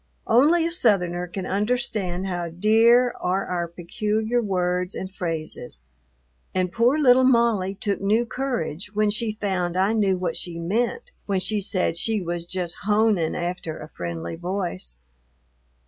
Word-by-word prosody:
Only 305 +9 +4
a 335 - -1
Southerner 180 - +2
can 185 +1 -5
understand 200 -3 -1
how 175 -2 -3
dear 225 +7 +4
are 185 +2 0
our 175 -1 -2
peculiar 215 +7 -1
words 180 -2 -1
and 185 0 -6
phrases, 160 - -4 0.8
and 185 -1 +1
poor 240 +7 +3
little 260 -3 +5
Molly 235 -6 +3
took 200 0 -2
new 215 +4 +2
courage 210 - -3
when 210 0 +2
she 215 0 -2
found 180 -4 -1
I 195 +4 +3
knew 200 -4 +2
what 180 -2 -2
she 170 -1 -6
meant 240 - -1 0.2
when 195 -2 +1
she 210 +2 0
said 185 -4 -1
she 220 +4 0
was 170 -2 -4
just 175 -1 -2
"honin'" 210 -6 +2
after 175 -2 -3
a 155 - -9
friendly 85 - -5
voice. 175 - -4
195 Hz, 145 wpm, -24 LUFS, 175-225 Hz, 0.8 s, little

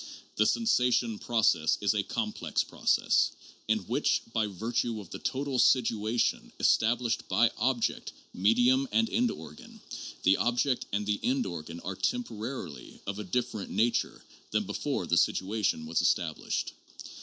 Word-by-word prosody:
The 110 - +3
sensation 125 - +2
process 95 -9 +2
is 100 0 +2
a 105 - +1
complex 105 +1 -2
process, - - +2 0.3
in - - +3
which, - - +1
by 110 -2 +1
virtue 115 +3 -2
of 100 -5 -11
the - - -6
total 135 -1 -2
situation 115 -2 +2
established 115 0 +2
by 115 0 +4
object, 125 -3 0 0.2
medium, 125 +7 +3
and 225 0 +3
end 240 +2 +2
organ, 75 - -10 0.4
the 95 - +5
object 125 +2 0
and 105 +1 -1
the 105 0 0
end 130 0 +1
organ 85 -2 -6
are 95 +1 -5
temporarily 120 - -4
of 100 +1 -4
a - - -3
dif 125 +6 -1
ferent 105 -3 -6
nature 115 +1 0 0.3
than - - +1
before - - -2
the - - +3
situation 95 -4 0
was 80 +1 0
established. - - -1
110 Hz, 145 wpm, -29 LUFS, 100-125 Hz, 0.4 s, the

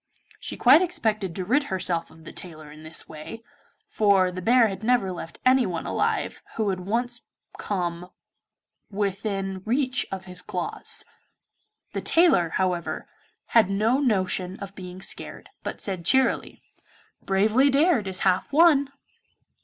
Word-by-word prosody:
She - - -6
quite 330 - +7
expected 215 - -1
to 185 - -3
rid 280 +8 +2
herself 180 -4 -1
of 160 0 -17
the - - -10
tailor 155 -4 -8
in 155 +1 -13
this 155 +1 -4
way, 160 +9 -9 0.4
for 195 -3 +3
the 185 0 -6
bear 235 +3 +5
had 195 -1 -6
never 220 -4 +2
left 170 -2 -8
anyone 245 -10 +2
alive - - -1
who 215 -2 0
had 185 -1 -2
once 235 +5 -2 0.4
come 180 -3 -3 0.8
within 195 -1 -2
reach 255 +2 0
of 190 -1 -5
his 180 -1 -7
claws. - - -4 0.9
The - - -2
tailor, 325 - +4
however, 180 -1 -2 0.4
had 225 -5 +4
no 220 +6 +2
notion 190 -6 0
of 195 -1 -8
being 185 -1 -9
scared, - - -7
but - - -6
said 190 -4 -4
cheerily, 265 +7 +1 0.6
'Bravely 215 +8 +3
dared 280 - +3
is 190 -1 -1
half 185 -1 +1
won. 290 -3 +5
195 Hz, 140 wpm, -25 LUFS, 180-240 Hz, 0.9 s, quite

